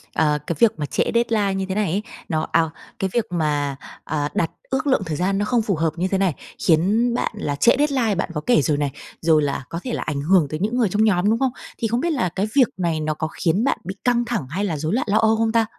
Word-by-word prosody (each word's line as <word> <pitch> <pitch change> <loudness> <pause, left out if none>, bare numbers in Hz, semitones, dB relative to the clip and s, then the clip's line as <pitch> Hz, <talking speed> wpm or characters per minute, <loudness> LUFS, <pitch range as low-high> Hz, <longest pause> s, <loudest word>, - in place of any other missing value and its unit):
ờ, 150 -2 +2
cái 170 - -1
việc 230 -2 +6
mà 150 - -1
trễ - - 0
deadline 225 -4 +1
như 190 0 -2
thế 190 - -2
này 205 -5 0
ấy, 200 +4 -1 0.3
nó 155 -3 -1
à, 165 -1 +3 0.3
cái 190 - 0
việc 235 -2 +1
mà, 145 -4 0 0.3
à, 145 -1 -1
đặt 165 - 0 0.2
ước 265 +2 -1
lượng 260 -7 +2
thời 155 -3 -3
gian 195 +3 0
nó 205 - 0
không 245 0 +2
phù 210 -3 0
hợp 160 +1 +1
như 175 +2 0
thế 195 - 0
này, 190 -4 +2 0.3
khiến 205 +9 +3
bạn - - -1
là 145 -8 -2
trễ 235 +11 +5
deadline, 265 -7 +1
bạn 185 - -2
có 150 - -3
kể 245 -10 +4
rồi 145 +1 +1
này, 145 -1 -1 0.3
rồi 160 -2 +4
là 140 -2 -1
có 165 - -4
thể 250 - -3
là - - -2
ảnh 145 -2 -3
hưởng 165 0 +3
tới 155 - -4
những 215 +6 -1
người 230 -5 +2
trong 210 +4 +2
nhóm, 200 -2 +3
đúng 225 +1 +2
không? 265 -1 +1 0.3
Thì 230 - -1
không 235 +2 0
biết 340 - 0
là 235 -11 0
cái 190 +5 -2
việc 260 -4 +6
này 170 -4 0
nó 155 0 -1
có 160 +1 -3
khiến 170 +5 0
bạn 275 - +1
bị 190 +2 -5
căng 240 -1 +2
thẳng 225 - -2
hay 190 +8 -2
là 165 -6 -2
rối 155 +5 -2
loạn 240 - 0
lo 205 - +3
âu 220 0 +4
không 225 0 +1
ta? 225 0 +3
190 Hz, 280 wpm, -22 LUFS, 160-225 Hz, 0.3 s, việc